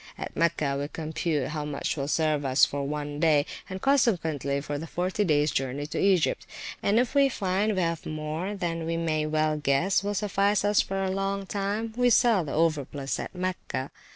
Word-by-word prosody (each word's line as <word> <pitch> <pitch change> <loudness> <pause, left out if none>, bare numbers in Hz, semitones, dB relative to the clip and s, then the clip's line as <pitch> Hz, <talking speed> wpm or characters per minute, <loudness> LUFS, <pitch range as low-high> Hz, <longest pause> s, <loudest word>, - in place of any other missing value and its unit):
At - - -6
Mecca 155 -4 +1
we 145 - -2
compute 155 -2 -2
how 150 -1 -3
much 145 -1 -2
will 140 -2 -3
serve 155 -1 +1
us 135 0 +5
for 140 -1 -3
one 145 0 -4
day, 150 -3 +4 0.2
and 190 0 -5
consequently, 165 - +2
for 145 0 -4
the 165 - -6
forty 185 +5 -1
days 150 -4 +2
journey 135 +2 -2
to 150 - -4
Egypt, 190 -4 +2 0.3
and 205 +2 +2
if 245 +1 +2
we 280 -1 +5
find 200 -1 0
we 185 - +1
have 165 -1 -2
more 155 +6 -3
than 165 -4 -3
we 165 0 -1
may 155 -2 0
well 155 0 +1
guess 150 +7 +2
will 205 +1 -2
suffice 200 0 +1
us 205 0 +4
for 195 0 -2
a 190 - 0
long 195 +1 -2
time, 205 +3 -2
we 245 0 +3
sell 235 -6 +4
the 145 - -6
overplus 145 -4 0
at - - -6
Mecca. 180 -7 -3
165 Hz, 195 wpm, -27 LUFS, 150-195 Hz, 0.3 s, us